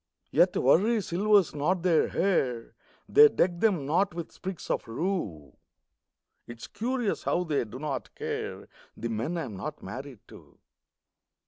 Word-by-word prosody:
Yet - - +3
worry 205 - +4
silvers 200 +1 +3
not 165 +5 0
their 170 -3 +3
hair; 130 -11 0 0.3
They 445 +1 +8
deck 175 - 0
them 185 -10 +2
not 175 +5 +1
with 170 -1 -6
sprigs 190 -2 -6
of - - -2
rue. 115 - -3 0.9
It's 120 -1 -9
curious 245 -1 -2
how 180 - 0
they 150 -7 -1
do 115 +3 -9
not 140 -1 -5
care - - -5 0.3
The 115 - -4
men 115 +10 -2
I 165 - -2
am 110 -8 -7
not 150 +10 -6
married 130 -3 -8
to. - - -16
165 Hz, 145 wpm, -28 LUFS, 130-190 Hz, 0.9 s, They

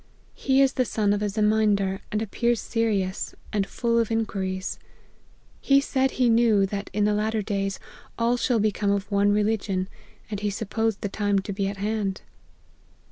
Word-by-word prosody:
He 270 0 +3
is 270 - +2
the 255 - +2
son 210 -3 +1
of 205 - -1
a 210 - 0
Ze 215 +2 -2
mindar, 210 -3 +2
and 215 +1 0
appears 235 +2 0
serious, 210 -5 -1 0.2
and 200 -2 0
full 235 +2 0
of 230 - +1
inquiries. 195 -4 -2 0.8
He 275 0 +4
said 265 -1 +1
he 250 -1 +3
knew, 225 -3 +4
that 200 +1 -4
in 210 +1 0
the 210 - +2
latter 215 +1 0
days, 195 -1 -2 0.4
all 235 +1 +2
shall 245 -1 +1
become 210 -1 0
of 200 +1 -1
one 200 0 +3
religion; 205 -3 0 0.4
and 205 - -2
he 205 0 -1
supposed 220 +1 -2
the - - -1
time 205 0 0
to 195 +1 -2
be 195 0 -1
at 200 0 -4
hand." 205 -1 -2
210 Hz, 180 wpm, -25 LUFS, 200-225 Hz, 0.8 s, He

